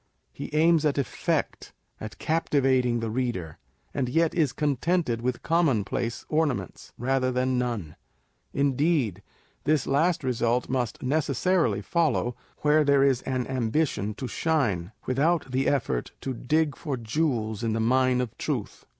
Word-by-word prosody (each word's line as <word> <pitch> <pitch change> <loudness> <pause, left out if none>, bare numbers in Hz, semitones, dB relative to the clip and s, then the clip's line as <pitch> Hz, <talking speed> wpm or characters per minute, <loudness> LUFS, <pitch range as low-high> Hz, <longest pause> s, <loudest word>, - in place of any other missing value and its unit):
He - - -6
aims 160 0 +4
at 150 -2 +1
effect, 140 - -2 0.3
at 110 -1 -8
captivating 130 -6 +1
the 115 -1 -2
reader, 115 -10 -3 0.3
and 130 -3 -1
yet 165 +4 +2
is 155 -6 +2
con 145 -1 0
tented 160 -8 0
with 125 0 -2
commonplace 125 - 0
ornaments, 145 - -1
rather 130 +1 +1
than 130 0 +1
none. 115 -11 -3 0.6
Indeed, 140 - +1 0.4
this 155 -1 +2
last 160 +4 +1
result 120 -1 0
must 125 -3 -2
necessarily 155 +6 +1
follow, 160 -8 +1 0.3
where 150 +1 +4
there 140 -1 +4
is 135 -2 +3
an 130 -2 -1
ambition 125 -4 -1
to 130 - -5
shine, 115 - 0
without 145 +2 +1
the 130 +1 +1
effort 120 - -1
to 135 - -3
dig 150 +4 0
for 145 -5 -4
jewels 115 -3 -1
in 115 -1 0
the 115 - -1
mine 125 +2 +3
of 120 -4 -4
truth. - - -4
130 Hz, 140 wpm, -26 LUFS, 120-150 Hz, 0.6 s, aims